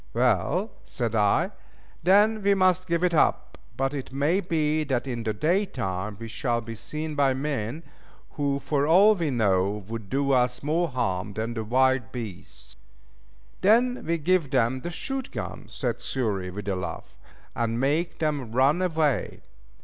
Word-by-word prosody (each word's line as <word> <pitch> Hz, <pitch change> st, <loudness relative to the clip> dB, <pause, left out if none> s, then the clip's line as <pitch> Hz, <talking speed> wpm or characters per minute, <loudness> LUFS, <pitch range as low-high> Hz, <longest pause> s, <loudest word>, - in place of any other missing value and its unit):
"Well," 190 Hz, +8 st, +1 dB
said 115 Hz, -3 st, -3 dB
I, 105 Hz, -2 st, +2 dB, 0.5 s
"then 210 Hz, +4 st, +4 dB
we 200 Hz, 0 st, +3 dB
must 185 Hz, -1 st, +2 dB
give 170 Hz, 0 st, 0 dB
it 180 Hz, -1 st, +2 dB
up, 160 Hz, -, +1 dB, 0.2 s
but 135 Hz, +1 st, 0 dB
it 135 Hz, -3 st, -5 dB
may 145 Hz, +7 st, +1 dB
be 155 Hz, -4 st, 0 dB
that 130 Hz, -3 st, -1 dB
in 120 Hz, -3 st, -3 dB
the 110 Hz, -1 st, -1 dB
day 165 Hz, -, +1 dB
time 100 Hz, -, -4 dB
we 115 Hz, -, -6 dB
shall 120 Hz, +1 st, -1 dB
be 115 Hz, 0 st, -7 dB
seen 155 Hz, +7 st, -5 dB
by 140 Hz, -2 st, +2 dB
men, 140 Hz, +1 st, -3 dB, 0.5 s
who 140 Hz, -2 st, -1 dB
for 140 Hz, 0 st, 0 dB
all 195 Hz, +6 st, +7 dB
we 170 Hz, -6 st, -1 dB
know 100 Hz, -4 st, +1 dB
would 110 Hz, -3 st, -6 dB
do 140 Hz, 0 st, +1 dB
us 125 Hz, 0 st, +1 dB
more 165 Hz, +4 st, +1 dB
harm 105 Hz, -, -2 dB
than 110 Hz, 0 st, -4 dB
wild 130 Hz, -3 st, +2 dB
beasts." 85 Hz, -, -8 dB, 0.9 s
"Then 240 Hz, +5 st, +3 dB
we 170 Hz, +1 st, 0 dB
give 165 Hz, -1 st, +1 dB
them 130 Hz, -1 st, +1 dB
the 175 Hz, -, -4 dB
shoot 265 Hz, +9 st, -4 dB
gun," -, -, -6 dB
said -, -, -3 dB
Xury 105 Hz, -8 st, -2 dB
with 100 Hz, +2 st, -7 dB
a 100 Hz, -, 0 dB
laugh, 90 Hz, -1 st, -6 dB, 0.4 s
"and 115 Hz, 0 st, -1 dB
make 150 Hz, +6 st, 0 dB
them 145 Hz, -7 st, -2 dB
run 140 Hz, +7 st, +3 dB
away." 160 Hz, -6 st, 0 dB
135 Hz, 165 wpm, -26 LUFS, 115-165 Hz, 0.9 s, all